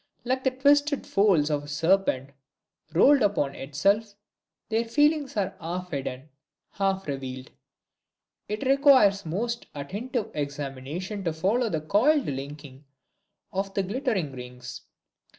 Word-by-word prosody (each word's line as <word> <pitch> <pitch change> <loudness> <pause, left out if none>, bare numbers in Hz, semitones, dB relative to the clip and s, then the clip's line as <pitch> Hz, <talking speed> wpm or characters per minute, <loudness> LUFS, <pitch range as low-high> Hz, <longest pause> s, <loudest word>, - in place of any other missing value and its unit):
Like 260 +1 -1
the 260 - +4
twisted 285 +2 +2
folds 185 -7 +3
of 145 -1 0
a - - -11
serpent 150 -3 +1 0.6
rolled 275 - +5
upon 195 -10 +1
itself, 200 +11 0 0.5
their 225 +1 +1
feelings 290 +2 +1
are 195 -1 -1
half 180 +2 -5
hidden, 135 -1 -5 0.4
half 195 -1 -1
revealed. 130 -2 -5 1.0
It 215 +5 -3
requires 260 - +5
a - - -7
most 235 +8 -3
attentive 215 - -4
examination 145 +7 -4
to 165 - 0
follow 215 +9 +1
the 160 -4 -2
coiled 255 - +3
linking 140 0 -7 0.7
of 195 0 -3
the 195 - +1
glittering 200 - -1
rings. 125 -1 -9
195 Hz, 125 wpm, -26 LUFS, 145-235 Hz, 1.0 s, rolled